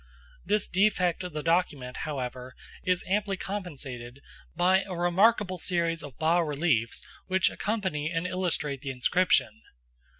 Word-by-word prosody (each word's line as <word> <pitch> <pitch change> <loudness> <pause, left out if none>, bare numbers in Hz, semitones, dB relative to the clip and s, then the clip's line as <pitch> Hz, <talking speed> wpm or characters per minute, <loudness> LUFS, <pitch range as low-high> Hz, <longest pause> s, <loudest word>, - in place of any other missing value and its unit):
This 205 +2 +1
defect 185 -2 +2
of 180 -3 -6
the 150 -1 -3
document, 155 -7 0
however, 130 -3 -5 0.3
is 180 -1 0
amply 200 0 0
compensated 140 -11 -6 0.4
by 185 +2 +4
a 190 -2 -6
remarkable 185 +2 +3
series 170 -1 0
of 140 -4 -10
bas 165 +2 +3
reliefs 145 -7 0 0.2
which 190 0 +3
accompany 190 -9 -2
and 165 +1 -2
illustrate 170 -7 -1
the 140 - -5
inscription. 130 - +2
170 Hz, 130 wpm, -28 LUFS, 140-185 Hz, 0.4 s, by